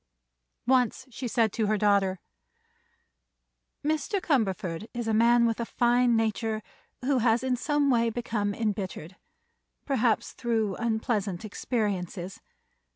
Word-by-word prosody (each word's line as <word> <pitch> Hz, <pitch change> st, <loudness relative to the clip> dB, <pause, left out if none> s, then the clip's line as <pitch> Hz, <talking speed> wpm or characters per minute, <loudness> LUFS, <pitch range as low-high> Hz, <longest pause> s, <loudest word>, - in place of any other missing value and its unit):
Once 255 Hz, 0 st, +2 dB
she 245 Hz, +2 st, -5 dB
said 225 Hz, -2 st, +1 dB
to 220 Hz, -2 st, 0 dB
her 215 Hz, +1 st, +2 dB
daughter: 200 Hz, -2 st, +2 dB, 1.7 s
"Mr. 315 Hz, +6 st, 0 dB
Cumberford 215 Hz, -, -1 dB
is 240 Hz, -1 st, -3 dB
a 220 Hz, -, +1 dB
man 235 Hz, +2 st, +5 dB
with 230 Hz, 0 st, 0 dB
a -, -, 0 dB
fine 240 Hz, 0 st, +3 dB
nature 220 Hz, 0 st, -1 dB, 0.4 s
who 270 Hz, -1 st, +2 dB
has 235 Hz, +1 st, +2 dB
in 260 Hz, -1 st, +1 dB
some 290 Hz, +2 st, +1 dB
way 230 Hz, -1 st, +3 dB
become 225 Hz, -3 st, -2 dB
embittered; 195 Hz, -5 st, -3 dB, 0.7 s
perhaps 245 Hz, -5 st, +1 dB
through 225 Hz, -5 st, -1 dB
unpleasant 220 Hz, -4 st, -1 dB
experiences. 200 Hz, -3 st, -3 dB
225 Hz, 120 wpm, -28 LUFS, 205-245 Hz, 1.7 s, man